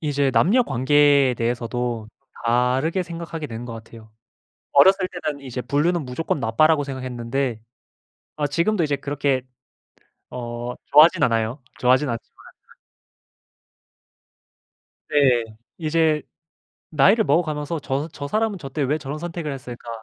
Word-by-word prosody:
이제 145 -3 0
남녀 175 - +4
관계에 140 - +3
대해서도 120 -1 -2 0.4
다르게 125 +9 +1
생각하게 165 -2 -6
된 115 +1 -6
것 120 - -7
같아요. 110 -1 -12 0.6
어렸을 190 +6 +5
때는 155 -5 -5
이제 130 -2 -5
'불륜은 160 +5 0
무조건 135 +4 -2
나빠.'라고 145 +7 +3
생각했는데, 130 -2 -3 0.8
아 150 - 0
지금도 170 +6 +1
이제 145 -2 0
그렇게 140 -1 -1 0.9
어 120 0 -5 0.2
좋아하진 165 +4 +7
않아요. 115 +3 0 0.2
좋아하진 130 +3 +3
않지만 115 -1 -2 2.9
네. 130 -5 +3 0.3
이제 160 -1 +1 0.7
나이를 195 +10 +4
먹어가면서 155 0 0
'저 140 +3 -2
저 140 - -6
사람은 215 +2 0
저 145 -5 -7
때 145 +2 -3
왜 145 +3 0
저런 145 0 -6
선택을 165 -3 -5
했을까?' 120 -3 -9
140 Hz, 290 characters per minute, -22 LUFS, 125-160 Hz, 2.9 s, 좋아하진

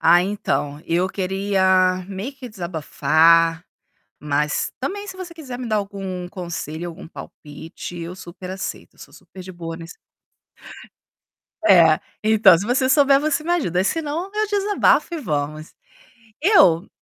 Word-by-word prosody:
Ah, 175 +1 +5
então, 150 -7 -2
eu 175 +3 0
queria 190 -1 +1
meio 200 +7 -5
que 260 -2 -9
desabafar, 165 -2 +2 0.6
mas 150 0 -1
também 400 +10 -4
se 380 - -7
você 370 -2 -8
quiser 265 -7 -8
me 250 - -5
dar 215 - 0
algum 195 -3 -4
conselho, 175 -3 -6
algum 170 +2 -11
palpite, 160 +2 -10
eu 170 +2 -6
super 180 0 -10
aceito, 190 0 -6
eu - - -25
sou - - -13
super 190 - -13
de 185 - -9
boa 165 -2 -7
nesse 165 +1 -11 1.7
É. 165 - +6 0.2
Então, 215 -4 +6
se 190 - -4
você 260 +2 +1
souber 275 0 +5
você 305 0 0
me 345 - -3
ajuda, 185 - 0
senão 325 - -2
eu 430 0 0
desabafo 405 -3 +2
e - - -3
vamos. 155 - -4 0.7
Eu 210 - +5
190 Hz, 145 wpm, -21 LUFS, 170-260 Hz, 1.7 s, É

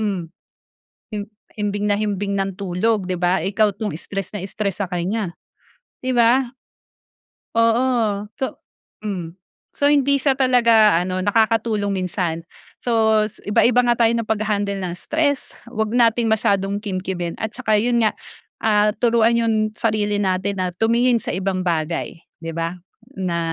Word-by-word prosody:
hmm, 200 -5 -1 0.9
him 205 - -2 0.4
himbing 205 0 -1
na 205 - +3
himbing 205 -1 -1
ng 195 0 -1
tulog, 195 +1 0
di 185 - 0
ba? 180 +1 +2
Ikaw 205 +1 +2
'tong 210 0 -3
stress 195 +1 -5
na 190 - -5
stress 200 -1 -3
sa - - -8
kaniya," 180 +1 -2 0.7
di 255 - 0
ba? 240 +2 +4 1.1
Oo, 230 -3 +2 0.2
so 265 - -2 0.5
hmm. 180 -4 -4 0.4
So, 285 - +1
hindi 280 -1 +3
siya 270 -1 +2
talaga 230 -7 +5
ano, 185 +1 -2
nakakatulong 215 -1 +1
minsan. 170 -2 -2 0.4
So 220 -2 +3 0.2
iba-iba 240 +4 +4
nga 240 - +4
tayo 225 - +4
ng 230 -1 -1
pag-ha-handle 205 -2 0
ng 175 - -3
stress, 295 -3 -1 0.2
huwag 220 -1 -2
nating 235 -1 +3
masyadong 200 -2 +1
kimkimin 185 -3 -4
at 220 +1 -3
tsaka 220 -4 +2
yun 235 0 +2
nga, 215 - +4 0.5
ah, 210 -1 +3
turuan 230 +1 +3
yung 230 -1 +1 0.2
sarili 210 -2 0
natin 190 0 -1
na 180 -1 -2
tumingin 235 +4 +3
sa - - -4
ibang 185 0 -1
bagay, 165 -1 -2 0.2
di 165 - -4
ba, 165 +1 -3 0.4
na 180 -3 -1
210 Hz, 145 wpm, -21 LUFS, 190-230 Hz, 1.1 s, talaga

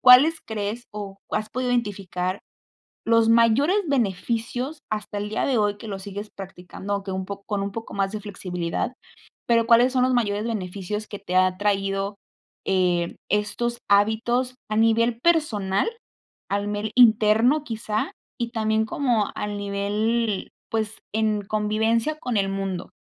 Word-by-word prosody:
¿cuáles 265 +6 +8
crees, 220 +2 -3
o 200 -2 -6 0.2
has 215 0 -1
podido 250 0 -1
identificar 195 -5 -1 0.7
los 230 0 +4
mayores 235 - +4
beneficios 245 - -1
hasta 210 -1 -3
el 205 +1 -3
día 215 - -1
de 260 -4 +2
hoy, 205 -1 +1
que 225 - -9
lo 195 -2 -5
sigues 205 +2 -7
practicando? 195 +1 -7
Aunque 195 -1 -3
un 190 0 -2
po 200 0 -6
con 205 -2 -1
un 200 - -2
poco 225 +1 -7
más 195 -1 0
de 215 - -4
flexibilidad, 185 +2 -3 0.5
pero, 230 -1 +4
¿cuáles 240 +2 +6
son 255 -1 +2
los 255 - +2
mayores 210 -3 +1
beneficios 210 -1 -4
que 205 - -6
te 185 -2 -5
ha 185 0 +4
traído, 195 0 0 0.5
eh, 180 -2 +1 0.2
estos 235 +3 0
hábitos 225 +5 +2 0.2
a 215 - -1
nivel 230 +1 +3
personal, 240 - +2 0.6
a 200 - +2
nivel 205 +1 -3
interno, 230 +4 +5
quizá, 220 -4 -2 0.3
y 235 -1 -2
también 220 -1 +1
como 235 -4 +1
al 210 0 -3
nivel, 205 +2 -1 0.2
pues, 220 -1 -2
en 215 -1 +1
convivencia 220 +7 +1
con 245 -6 -3
el 195 -1 +1
mundo? 195 -2 -3
215 Hz, 150 wpm, -24 LUFS, 200-235 Hz, 0.7 s, cuáles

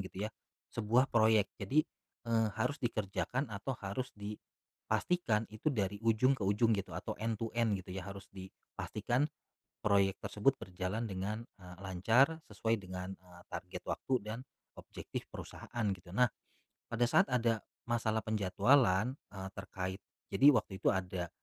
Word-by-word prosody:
gitu 95 +2 -4
ya, - - -6 0.4
sebuah 115 +4 +3
proyek. 110 -2 +5
Jadi, 140 +11 +3 0.5
eee, 115 -1 +4
harus 125 +6 0
dikerjakan 115 +3 -1
atau 120 +6 -3
harus 105 +6 -3
dipastikan 110 +4 -2
itu 110 +8 0
dari 100 -6 -1
ujung 115 +4 +4
ke 135 - -3
ujung 110 +3 +4
gitu 100 -1 -2
atau - - -3
end 115 -1 0
to 115 +1 -3
end 115 -3 +2
gitu 95 0 -7
ya. 95 +1 -5
Harus 100 0 -7
dipastikan 120 +8 -2 0.5
proyek 100 -2 +3
tersebut 130 +6 +1
berjalan 95 +5 -3
dengan, 100 +3 -2 0.2
eee, 90 -2 -11
lancar 115 - +3 0.2
sesuai 115 0 +1
dengan, 95 -1 -6
eee, 90 -1 -17
target 90 0 -6
waktu 130 - -1
dan 110 +3 -5 0.4
objektif - - -6
perusahaan 120 -2 -5
gitu. 90 -1 -9
Nah, 125 +3 +5 0.6
pada 120 +1 +2
saat - - +6
ada 115 -3 +2 0.3
masalah 110 -2 +1
penjadwalan, 110 +3 +3 0.2
eee, 95 -1 -5
terkait 95 0 -4 0.3
jadi 140 - +5
waktu 105 - +1
itu - - +3
ada, 90 -2 -2
105 Hz, 145 wpm, -34 LUFS, 95-115 Hz, 0.6 s, saat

